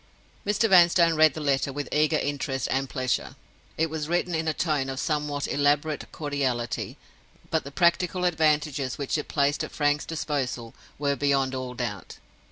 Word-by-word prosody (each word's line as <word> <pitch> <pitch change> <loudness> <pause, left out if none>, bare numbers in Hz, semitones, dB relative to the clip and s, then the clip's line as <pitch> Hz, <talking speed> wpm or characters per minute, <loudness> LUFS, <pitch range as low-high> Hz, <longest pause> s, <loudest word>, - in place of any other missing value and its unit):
Mr. 210 +2 +2
Vanstone 170 -3 +6
read 155 -2 +5
the - - -4
letter 140 -2 +1
with 145 0 -4
eager 155 +1 +3
interest 135 -2 -2
and 135 0 0
pleasure. 130 -2 -2 0.4
It 160 - +2
was 155 -1 -4
written 175 +1 0
in 160 0 -1
a - - +3
tone 150 -3 -1
of 135 0 -4
somewhat 150 -2 -1
elaborate 145 +1 0
cordiality; 135 -6 -2 0.5
but - - +1
the 140 - -7
practical 180 +2 +2
advantages 150 -5 +1
which 140 -2 -2
it - - -6
placed 145 0 +1
at - - -6
Frank's 145 0 0
disposal 140 -7 -3 0.2
were 140 -1 0
beyond 135 -1 +1
all 130 -1 -4
doubt. - - -5
145 Hz, 165 wpm, -26 LUFS, 135-160 Hz, 0.5 s, Vanstone